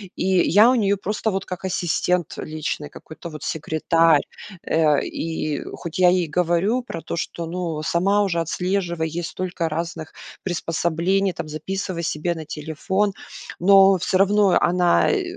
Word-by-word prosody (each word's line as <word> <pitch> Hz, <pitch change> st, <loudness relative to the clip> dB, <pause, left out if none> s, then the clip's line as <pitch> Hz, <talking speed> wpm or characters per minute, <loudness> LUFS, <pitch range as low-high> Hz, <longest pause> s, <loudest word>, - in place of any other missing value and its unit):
И -, -, -2 dB, 0.2 s
я 210 Hz, +7 st, +6 dB
у 255 Hz, -, +3 dB
неё 200 Hz, -4 st, +2 dB
просто 210 Hz, +2 st, -2 dB
вот 195 Hz, 0 st, -3 dB
как 180 Hz, 0 st, -7 dB
ассистент 175 Hz, -1 st, 0 dB
личный, 155 Hz, -1 st, -4 dB
какой-то 155 Hz, +3 st, -10 dB
вот 155 Hz, -2 st, -9 dB
секретарь. 160 Hz, 0 st, +2 dB, 0.4 s
Э, 155 Hz, -3 st, +3 dB
и 155 Hz, -2 st, -3 dB
хоть 170 Hz, 0 st, -6 dB
я 180 Hz, -1 st, +6 dB
ей 180 Hz, -2 st, +2 dB
говорю 175 Hz, +9 st, +1 dB
про 165 Hz, -8 st, -7 dB
то, -, -, -5 dB
что, 170 Hz, 0 st, -4 dB
ну, 165 Hz, -2 st, -4 dB
сама 195 Hz, +6 st, +2 dB
уже 175 Hz, -4 st, 0 dB
отслеживай, 175 Hz, -1 st, -1 dB
есть 165 Hz, +2 st, -4 dB
столько 175 Hz, -3 st, -3 dB
разных 165 Hz, 0 st, -5 dB, 0.3 s
приспособлений, 175 Hz, +2 st, 0 dB
там 160 Hz, -, -6 dB
записывай 170 Hz, +3 st, -4 dB
себе 165 Hz, +2 st, -1 dB
на 160 Hz, -1 st, -7 dB
телефон, 160 Hz, +7 st, -2 dB, 0.5 s
но 195 Hz, +1 st, +6 dB
всё 185 Hz, +2 st, +1 dB
равно 200 Hz, 0 st, +4 dB
она, 175 Hz, -, +3 dB
э, -, -, 0 dB
175 Hz, 150 wpm, -22 LUFS, 160-190 Hz, 0.5 s, я